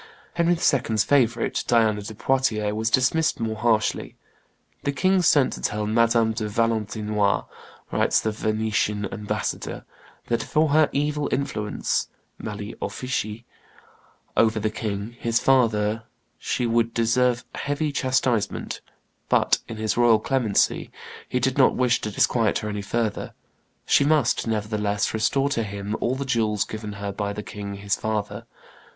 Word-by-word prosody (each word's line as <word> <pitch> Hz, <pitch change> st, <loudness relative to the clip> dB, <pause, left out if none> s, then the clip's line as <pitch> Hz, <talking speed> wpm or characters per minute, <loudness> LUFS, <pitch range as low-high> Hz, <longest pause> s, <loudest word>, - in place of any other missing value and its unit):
Henry 170 Hz, 0 st, +2 dB
II.'s 120 Hz, -, +2 dB
favorite, 120 Hz, -5 st, +1 dB
Diana 110 Hz, -3 st, +3 dB
de 105 Hz, +2 st, -8 dB
Poitiers, 110 Hz, -4 st, 0 dB
was 110 Hz, +1 st, 0 dB
dismissed 145 Hz, +6 st, +2 dB
more 110 Hz, -1 st, -2 dB
harshly. 110 Hz, -1 st, 0 dB, 0.7 s
"The 140 Hz, -, -1 dB
king 185 Hz, +5 st, +2 dB
sent 150 Hz, -6 st, +4 dB
to -, -, -7 dB
tell 105 Hz, 0 st, -1 dB
Madame 115 Hz, +1 st, +3 dB
de 110 Hz, -1 st, -3 dB
Valentinois," 105 Hz, -2 st, 0 dB, 0.5 s
writes -, -, +2 dB
the 110 Hz, -, -1 dB
Venetian 105 Hz, -1 st, -1 dB
ambassador, 105 Hz, -1 st, -4 dB, 0.4 s
"that 115 Hz, -, 0 dB
for 155 Hz, 0 st, +1 dB
her 155 Hz, +1 st, +4 dB
evil 150 Hz, +1 st, -1 dB
influence 130 Hz, -6 st, -1 dB, 0.3 s
(mali 105 Hz, +1 st, -6 dB
officii) 115 Hz, -3 st, -3 dB, 0.9 s
over 110 Hz, -1 st, +3 dB
the 110 Hz, 0 st, -1 dB
king 110 Hz, +1 st, -4 dB
his 115 Hz, 0 st, +1 dB
father 115 Hz, -4 st, +2 dB, 0.3 s
she 125 Hz, -, -1 dB
would 115 Hz, 0 st, +1 dB
deserve 120 Hz, +1 st, +2 dB
heavy 145 Hz, +1 st, -2 dB
chastisement; 130 Hz, -5 st, 0 dB, 0.5 s
but, -, -, +3 dB
in 115 Hz, -, -7 dB
his 110 Hz, 0 st, -1 dB
royal 120 Hz, -2 st, +5 dB
clemency, 115 Hz, -2 st, +1 dB, 0.4 s
he 125 Hz, -, 0 dB
did 130 Hz, +2 st, 0 dB
not 130 Hz, -, +5 dB
wish 125 Hz, -2 st, +2 dB
to 110 Hz, -, -3 dB
disquiet 110 Hz, +1 st, +2 dB
her 105 Hz, -, -4 dB
any 105 Hz, -1 st, -3 dB
further; 110 Hz, +1 st, -2 dB, 0.5 s
she -, -, +4 dB
must, 145 Hz, -6 st, +2 dB
nevertheless, 105 Hz, -2 st, -1 dB
restore 135 Hz, +6 st, +1 dB
to 115 Hz, -, 0 dB
him 100 Hz, 0 st, -4 dB
all 125 Hz, +2 st, +1 dB
the 140 Hz, +1 st, -4 dB
jewels 110 Hz, -5 st, +1 dB
given 110 Hz, -1 st, -6 dB
her 100 Hz, 0 st, -4 dB
by 100 Hz, 0 st, -3 dB
the 105 Hz, +1 st, -5 dB
king 100 Hz, -1 st, -6 dB
his 100 Hz, +1 st, -1 dB
father." 105 Hz, -1 st, -3 dB
110 Hz, 145 wpm, -24 LUFS, 105-130 Hz, 0.9 s, royal